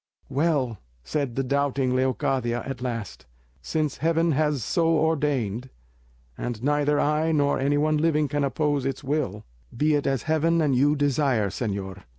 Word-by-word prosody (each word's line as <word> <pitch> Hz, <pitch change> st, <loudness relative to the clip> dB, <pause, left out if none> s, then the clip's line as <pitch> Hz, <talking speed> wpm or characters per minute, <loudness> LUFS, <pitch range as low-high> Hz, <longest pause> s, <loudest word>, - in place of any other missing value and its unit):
"Well," 135 Hz, -, 0 dB, 0.2 s
said 135 Hz, -, -2 dB
the 135 Hz, -, 0 dB
doubting 135 Hz, -1 st, 0 dB
Leocadia, 130 Hz, -2 st, 0 dB
at 135 Hz, -2 st, -5 dB
last, 115 Hz, -, -5 dB, 0.3 s
"since 150 Hz, -, -2 dB
Heaven 165 Hz, +1 st, +2 dB
has 150 Hz, -3 st, +1 dB
so 165 Hz, -, +1 dB
ordained, 140 Hz, -7 st, 0 dB, 0.7 s
and 120 Hz, -, -5 dB
neither 145 Hz, +1 st, +2 dB
I 155 Hz, +2 st, +1 dB
nor 145 Hz, -2 st, +2 dB
any 140 Hz, +2 st, +1 dB
one 155 Hz, +1 st, +2 dB
living 155 Hz, -1 st, +2 dB
can 145 Hz, +1 st, -1 dB
oppose 145 Hz, 0 st, 0 dB
its 135 Hz, +1 st, -3 dB
will, 135 Hz, -8 st, -2 dB, 0.3 s
be 150 Hz, +3 st, +2 dB
it 145 Hz, -1 st, +1 dB
as 135 Hz, -2 st, 0 dB
Heaven 160 Hz, +2 st, +2 dB
and 145 Hz, -5 st, +2 dB
you 145 Hz, +4 st, +3 dB
desire, 140 Hz, -7 st, +1 dB
señor. 100 Hz, -4 st, -4 dB
140 Hz, 155 wpm, -25 LUFS, 125-150 Hz, 0.7 s, you